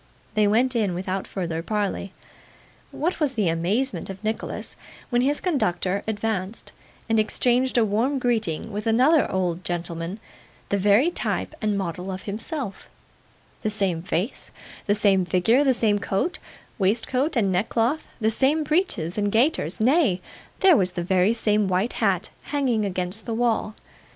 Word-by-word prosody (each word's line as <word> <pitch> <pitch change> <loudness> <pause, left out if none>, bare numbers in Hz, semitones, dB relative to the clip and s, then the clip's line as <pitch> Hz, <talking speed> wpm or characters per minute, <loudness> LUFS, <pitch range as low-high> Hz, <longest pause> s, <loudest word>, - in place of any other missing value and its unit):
They 215 -1 +3
went 245 +5 +2
in, 205 -6 +1
without 185 +1 -3
further 165 -4 -3
parley. 200 0 -2 0.8
What 340 +4 -2
was 295 -4 +1
the 210 -8 +1
amazement 195 +13 0
of 195 +2 -8
Nicholas 220 +1 -3 0.4
when 240 0 +3
his 285 +3 +1
conductor 200 - 0
advanced, 215 -1 -3 0.4
and 225 -1 +2
exchanged 245 +4 +1
a 230 - +5
warm 230 +7 +1
greeting 225 -10 -1
with 210 +2 -4
another 260 +8 +4
old 180 -2 -1
gentleman, 170 +2 -4 0.5
the 200 - +1
very 210 - +4
type - - -2
and 210 -2 0
model 180 0 -3
of 190 0 -6
himself 220 +1 -5 0.7
the 215 - 0
same 195 -6 -1
face, 185 +5 -2 0.4
the 205 - +3
same 200 -3 +3
figure, 185 - +3
the 270 - +4
same 215 -4 +2
coat, 200 - -1 0.4
waistcoat, 240 - +1
and 205 -5 +2
neckcloth, 230 - 0
the 220 -1 +2
same 280 +7 +2
breeches 295 - 0
and 205 0 0
gaiters 225 - +1
nay, 250 - +3 0.4
there 380 -4 +7
was 185 -7 +2
the 175 - -3
very 185 +3 +3
same 210 -3 +1
white 190 +5 0
hat 195 -2 0
hanging 255 -7 0
against 185 +2 -3
the 230 - -1
wall! 225 -2 0
215 Hz, 150 wpm, -24 LUFS, 185-245 Hz, 0.8 s, there